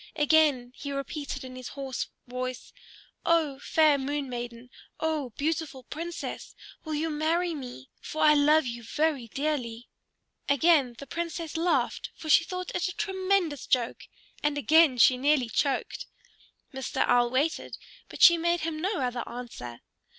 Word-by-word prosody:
Again 295 -5 +3
he 280 - -6
repeated 280 +1 -4
in 255 0 -9
his 255 -1 -7
hoarse 270 -2 -4 0.2
voice, 255 0 -5 0.5
"O 310 -5 +2
fair 305 -2 +3
Moon 285 +1 -2
Maiden, 240 0 -7 0.3
O 310 -4 -1
beautiful 305 -3 -2
Princess, 335 +6 -6 0.3
will 315 -1 -3
you 315 +2 -1
marry 330 +3 0
me? 245 - -8
For 310 - -3
I 305 -1 +7
love 300 +1 +4
you 235 -1 -5
very 285 +1 -1
dearly." 250 -3 -3 0.6
Again 280 -3 +4
the 280 - -8
Princess 335 +1 -4
laughed, 335 +2 0
for 315 - -8
she 320 - +7
thought 365 0 -5
it 360 +2 0
a 365 - -4
tremendous 380 - 0
joke; 245 -3 0 0.3
and 295 0 0
again 305 -2 +5
she 250 +1 +6
nearly 275 -3 +2
choked. 270 +3 -1 0.7
Mr. 265 -1 -1
Owl 245 -1 +3
waited, 280 +6 -1 0.3
but - - -2
she 340 -1 +9
made 340 0 +1
him 310 -1 -3
no 380 -3 -1
other 245 -1 -1
answer. 225 - -8
290 Hz, 150 wpm, -28 LUFS, 255-320 Hz, 0.7 s, she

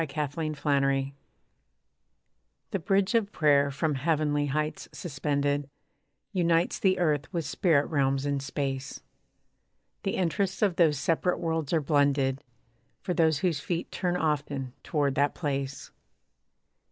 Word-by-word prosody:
BRIDGE 155 -2 -5 0.2
OF 155 -2 -3
PRAYER 135 -2 +2 1.6
The 195 - -1
bridge 195 +5 +1
of 220 -3 +2
prayer 145 -4 +3
from 145 +3 -1
heavenly 145 0 +1
heights 150 +2 -2
suspended 145 -1 -1 0.6
Unites 170 -2 +2
the 190 -1 +3
earth 150 -6 0
with 165 -3 -2
spirit 155 -6 +2
realms 135 -3 0
in 140 -1 0
Space. 135 -1 -4 1.0
The 195 - -2
interests 190 +3 0
of 190 -5 +2
those 155 -4 +4
separate 165 +5 +1
worlds 160 -3 -2
are 165 - +2
blended 140 -2 +2 0.6
For 180 - -1
those 160 -4 +2
whose 165 -5 +1
feet 170 +2 -3
turn 180 -1 -1
often 145 -5 -1
toward 145 -4 0
that 140 +1 +1
place. 140 -3 -3
150 Hz, 130 wpm, -28 LUFS, 140-170 Hz, 1.6 s, those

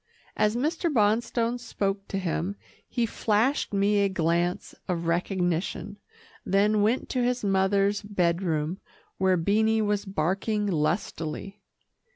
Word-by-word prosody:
As 210 +1 +2
Mr. 320 +6 0
Bonstone 230 +1 +1
spoke 200 -4 -3
to 195 - -3
him, 185 +1 -2 0.3
he 240 -1 0
flashed 225 +5 +1
me 205 +1 +2
a 200 0 +3
glance 175 0 0
of 170 -2 -2
recognition, 175 +2 -1 0.5
then 205 +2 +2
went 225 +5 +1
to 255 - 0
his 250 -1 0
mother's 195 +1 +2
bed 180 -4 0
room, 165 0 -1 0.4
where 190 -1 +3
Beanie 220 +5 +2
was 205 0 0
barking 195 +4 -1
lustily. 170 +2 -2
200 Hz, 125 wpm, -27 LUFS, 180-215 Hz, 0.5 s, a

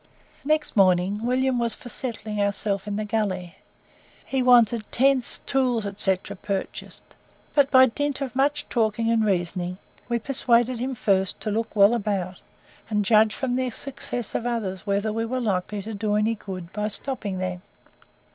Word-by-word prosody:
Next 305 +1 0
morning 190 +1 +3
William 255 0 +1
was 235 -1 -1
for 245 - -11
settling 215 -4 -4
ourselves 200 0 -1
in 205 - -2
the 215 +1 -2
gully. 200 -5 -2 0.7
He 265 -1 -1
wanted 235 -3 +4
tents, 265 -1 +3
tools, 250 -5 +1
&c., 195 -1 +2 0.3
purchased, 195 -2 -5 0.4
but 285 -2 +4
by 260 -2 +7
dint 285 +3 -2
of 265 -3 -4
much 290 +2 +1
talking 225 0 +1
and 225 -1 +3
reasoning, 180 -2 -1 0.3
we 235 - +1
persuaded 240 -1 +2
him 260 +2 -2
first 190 -4 +1
to 215 - -2
look 225 +2 -2
well 200 +2 +6
about, 195 -5 -2 0.5
and 210 -2 0
judge 215 0 +4
from 260 -3 -1
the 255 -1 0
success 245 -2 -5
of 240 - -2
others 210 -5 -3
whether 200 +2 0
we 225 +1 -1
were 255 +3 -2
likely 205 -2 -2
to 220 +2 -6
do 210 0 -1
any 215 +2 +2
good 185 -5 -8
by 210 0 -1
stopping 215 -3 -4
there. 185 -1 -3
220 Hz, 165 wpm, -24 LUFS, 200-250 Hz, 0.7 s, by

